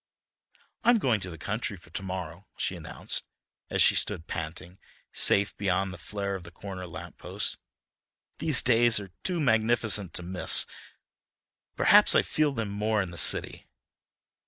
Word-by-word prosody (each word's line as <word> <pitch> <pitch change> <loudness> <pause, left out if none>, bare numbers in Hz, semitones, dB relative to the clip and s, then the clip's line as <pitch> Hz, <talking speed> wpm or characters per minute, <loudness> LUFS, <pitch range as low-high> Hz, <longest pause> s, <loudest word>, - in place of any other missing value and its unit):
"I'm 240 0 +4
going 125 - 0
to 95 -2 -6
the 80 - -10
country 105 +4 -4
for 85 -2 -19
to 95 - -4
morrow," 90 0 -7
she - - -3
announced, - - -5 0.5
as - - +2
she - - +5
stood 80 - -1
panting, 85 +3 -7 0.3
safe 100 0 +4
beyond 95 -1 -1
the 90 - -11
flare 100 +2 -4
of 95 - -5
the 85 - -12
corner 90 +1 -9
lamp 80 - -11
post. - - -2 0.8
"These 155 -5 +4
days 120 -2 +3
are 100 -2 -10
too 180 -2 -1
magnificent 110 - +2
to 90 - -4
miss, 90 +1 +4
though - - -22 1.0
perhaps - - +6
I - - +4
feel 155 -1 0
them 115 -6 -4
more 105 +1 -1
in 90 - -8
the 85 - -11
city." - - +2
100 Hz, 160 wpm, -27 LUFS, 90-115 Hz, 1.0 s, perhaps